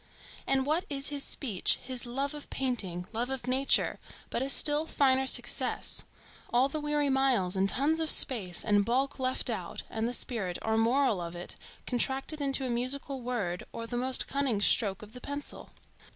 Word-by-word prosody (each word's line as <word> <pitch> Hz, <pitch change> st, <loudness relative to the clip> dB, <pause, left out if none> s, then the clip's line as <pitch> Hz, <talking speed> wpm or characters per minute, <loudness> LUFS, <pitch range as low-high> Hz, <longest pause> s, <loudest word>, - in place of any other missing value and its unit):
and 265 Hz, -1 st, +1 dB
what 315 Hz, +5 st, +1 dB
is 280 Hz, 0 st, 0 dB
his 285 Hz, -1 st, -2 dB
speech, 215 Hz, -10 st, +2 dB
his 255 Hz, -1 st, -2 dB
love 275 Hz, +4 st, -2 dB
of 295 Hz, -1 st, -8 dB
painting, 200 Hz, -10 st, -3 dB
love 240 Hz, +3 st, -2 dB
of 265 Hz, -2 st, -4 dB
nature, 260 Hz, +2 st, +2 dB, 0.3 s
but -, -, -1 dB
a 270 Hz, -, -2 dB
still 295 Hz, +2 st, +4 dB
finer 265 Hz, -3 st, +2 dB
success,—all 250 Hz, -1 st, 0 dB
the 305 Hz, +3 st, -4 dB
weary 295 Hz, -1 st, 0 dB
miles 260 Hz, -9 st, +1 dB
and 195 Hz, +1 st, +1 dB
tons 300 Hz, +8 st, +1 dB
of 320 Hz, -1 st, +1 dB
space 205 Hz, -, +4 dB
and 205 Hz, -1 st, +3 dB
bulk 265 Hz, +6 st, -1 dB
left 255 Hz, 0 st, -1 dB
out, -, -, -3 dB
and 225 Hz, +1 st, -2 dB
the -, -, -2 dB
spirit 205 Hz, -8 st, -1 dB
or 220 Hz, 0 st, 0 dB
moral 230 Hz, -2 st, +2 dB
of 170 Hz, 0 st, -6 dB
it 175 Hz, -, -6 dB, 0.3 s
contracted 270 Hz, +5 st, -1 dB
into 275 Hz, -1 st, -1 dB
a -, -, -1 dB
musical 260 Hz, +3 st, -1 dB
word, 215 Hz, -8 st, -3 dB
or 230 Hz, -, -6 dB
the 240 Hz, -, -6 dB
most 255 Hz, +1 st, +3 dB
cunning 275 Hz, -6 st, 0 dB
stroke 205 Hz, -1 st, +2 dB
of 215 Hz, +1 st, -13 dB
the 250 Hz, -, -10 dB
pencil? 285 Hz, 0 st, -6 dB
255 Hz, 180 wpm, -29 LUFS, 225-275 Hz, 0.3 s, still